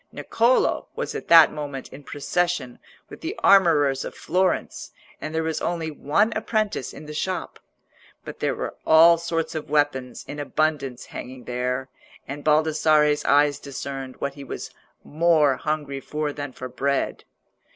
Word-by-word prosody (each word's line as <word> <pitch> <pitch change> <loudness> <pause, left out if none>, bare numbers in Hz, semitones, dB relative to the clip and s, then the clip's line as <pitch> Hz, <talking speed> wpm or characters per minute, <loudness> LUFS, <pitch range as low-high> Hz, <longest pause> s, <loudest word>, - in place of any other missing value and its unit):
Niccolò 235 +3 +1
was - - -3
at - - -6
that 165 -2 +8
moment 145 -4 -6
in 140 +2 -11
procession 170 -2 -2 0.3
with - - -12
the 335 +5 -4
armourers 150 -8 +5
of - - -7
Florence, 185 0 -1 0.3
and 155 +1 -5
there 160 - 0
was 160 0 -2
only 165 -2 -2
one 200 +10 +1
apprentice 215 - -1
in 155 - -11
the 150 - -8
shop. 180 +3 -3 0.7
But - - -8
there - - 0
were - - -4
all 165 +1 +7
sorts 165 -1 -2
of 155 -2 -5
weapons 145 -4 0
in 145 - -7
abundance 145 -4 -1
hanging 130 0 -9
there, 125 +1 -2 0.4
and 145 +2 -6
Baldassarre's 155 -1 +3
eyes 145 0 +3
discerned 135 -1 -6
what 140 - -3
he 140 0 -10
was 135 - -7 0.3
more 155 -3 +3
hungry 150 -3 -3
for 150 +1 -3
than 145 -2 -6
for 130 0 -7
bread. 140 +2 -2
150 Hz, 150 wpm, -24 LUFS, 140-165 Hz, 0.7 s, that